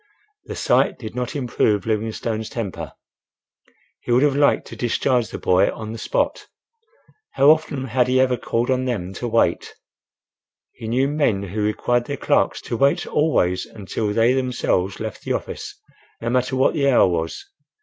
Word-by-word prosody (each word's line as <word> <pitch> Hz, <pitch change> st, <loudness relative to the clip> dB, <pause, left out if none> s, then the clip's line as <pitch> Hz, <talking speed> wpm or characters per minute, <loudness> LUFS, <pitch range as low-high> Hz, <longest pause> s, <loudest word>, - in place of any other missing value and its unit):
The -, -, -6 dB
sight -, -, +2 dB
did 110 Hz, -3 st, -8 dB
not 125 Hz, +4 st, -4 dB
improve 115 Hz, -6 st, 0 dB
Livingstone's 110 Hz, 0 st, -2 dB
temper. 110 Hz, -7 st, -5 dB, 1.1 s
He -, -, -5 dB
would 125 Hz, +3 st, +4 dB
have 145 Hz, -2 st, +3 dB
liked 145 Hz, 0 st, +3 dB
to -, -, -8 dB
discharge 120 Hz, 0 st, 0 dB
the -, -, -6 dB
boy 90 Hz, 0 st, +3 dB
on 110 Hz, -1 st, -7 dB
the 115 Hz, -, -7 dB
spot. -, -, -1 dB, 0.9 s
How 140 Hz, +2 st, +6 dB
often 155 Hz, -4 st, 0 dB
had 125 Hz, 0 st, +1 dB
he 130 Hz, +1 st, +2 dB
ever 130 Hz, -1 st, +3 dB
called 120 Hz, +1 st, -1 dB
on 130 Hz, 0 st, 0 dB
them 95 Hz, -7 st, -3 dB
to 120 Hz, -, -4 dB
wait? 115 Hz, 0 st, +1 dB, 1.0 s
He 110 Hz, -, -9 dB
knew 130 Hz, +4 st, +1 dB
men 140 Hz, -9 st, +1 dB
who 100 Hz, +3 st, -4 dB
required 120 Hz, +3 st, 0 dB
their 140 Hz, +1 st, -4 dB
clerks -, -, +1 dB
to 115 Hz, -, -4 dB
wait 140 Hz, +2 st, +2 dB
always 90 Hz, -, +1 dB
until 105 Hz, 0 st, -4 dB
they 115 Hz, +4 st, +3 dB
themselves 125 Hz, -7 st, -1 dB
left 110 Hz, -2 st, -5 dB
the -, -, -2 dB
office, -, -, -6 dB, 0.4 s
no 115 Hz, +1 st, -2 dB
matter 130 Hz, +1 st, 0 dB
what 130 Hz, -, +3 dB
the 140 Hz, -4 st, +2 dB
hour 125 Hz, -, +5 dB
was. 80 Hz, -, -3 dB
120 Hz, 170 wpm, -22 LUFS, 110-130 Hz, 1.1 s, How